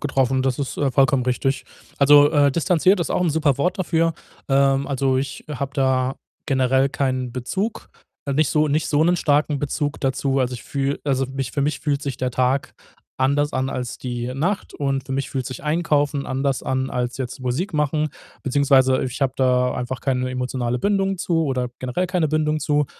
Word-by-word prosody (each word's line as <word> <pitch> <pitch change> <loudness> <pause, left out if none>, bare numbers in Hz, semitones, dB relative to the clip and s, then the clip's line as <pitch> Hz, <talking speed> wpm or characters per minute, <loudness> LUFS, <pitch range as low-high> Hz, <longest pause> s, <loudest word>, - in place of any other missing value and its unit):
getroffen 135 -3 +1
und 130 - 0
das 130 -2 0
ist, 140 -2 -3
äh, 140 -2 +1
vollkommen 135 0 +3
richtig. 130 +2 -1 0.3
Also, 145 +1 +7
äh, 145 -3 +3
distanziert 180 +4 +3
ist 170 - -2
auch - - +1
'n 175 -2 +2
super 150 -3 +1
Wort 180 +6 0
dafür. 165 -2 +1 0.3
Ähm, 135 0 +3
also, 135 -1 +1
ich 135 0 -4
habe 140 -1 -4
da 130 -1 +1 0.3
generell 130 0 +2
keinen 130 -3 -2
Bezug, 190 - -3 0.4
nicht 150 +1 +2
so 155 0 +2
nicht 150 +2 +1
so 150 +1 +3
'nen 175 +2 +3
starken 150 -2 +1
Bezug 145 +1 -2
dazu. 135 0 0
Also, 125 -1 0
ich 120 - -8
fühle 140 0 -2
also, 135 -2 +1
mich 135 -1 -4
für 140 - -1
mich 150 +2 -1
fühlt 145 -2 0
sich 140 -4 -3
der 130 -1 -2
Tag 130 +2 0 0.5
anders 145 +2 +2
an 130 0 -1
als 125 -3 -4
die 120 -1 -4
Nacht 175 +10 -2
und 135 -2 -1
für - - -10
mich 135 0 -2
fühlt 130 -2 -3
sich 130 +4 -7
Einkaufen 150 -3 +1
anders 135 0 -1
an 130 0 -1
als 125 -1 -2
jetzt 130 -1 -5
Musik 135 - -2
machen. 150 0 0 0.3
Beziehungsweise, 135 -1 +3
ich 130 +1 -4
habe 135 -2 +1
da 125 -1 +2
einfach 125 0 -4
keine 130 -1 -1
emotionale 125 -1 -2
Bindung 195 +3 0
zu 170 -2 +1
oder 130 -3 -1
generell 130 +9 -1
keine 175 -3 0
Bindung 155 0 0
zu. 145 0 +1
135 Hz, 195 wpm, -22 LUFS, 130-150 Hz, 0.5 s, Also